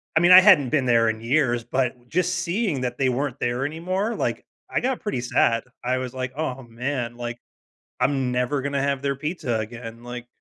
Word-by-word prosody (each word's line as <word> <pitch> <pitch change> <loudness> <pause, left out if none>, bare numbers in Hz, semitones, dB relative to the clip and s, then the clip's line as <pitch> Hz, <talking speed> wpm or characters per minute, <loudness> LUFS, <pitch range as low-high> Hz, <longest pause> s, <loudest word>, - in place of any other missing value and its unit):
I - - +6
mean, 175 +1 +5
I 185 +1 +11
hadn't 180 -10 +6
been 140 -2 +1
there 115 -2 +4
in 110 0 -3
years, 120 -1 +1
but 125 0 -2
just 180 +3 +1
seeing 175 - -1
that 125 -1 -3
they 135 -1 +2
weren't 135 +1 -2
there 120 +2 -1
anymore, 185 +8 -2
like, - - -2 0.2
I - - 0
got 260 0 -1
pretty 205 - -3
sad. 115 -1 +2 0.2
I 125 +1 0
was, 130 -1 -4
like, 130 -1 -4
"Oh, 135 -4 -3
man. 120 +1 -4
Like, 120 -1 -5 0.6
I'm 130 -1 +1
never 125 +3 0
gonna 140 0 -1
have 140 -1 0
their 140 0 -1
pizza 140 -7 -2
again." 115 +1 -7
Like 120 0 -7
130 Hz, 200 wpm, -24 LUFS, 120-150 Hz, 0.6 s, I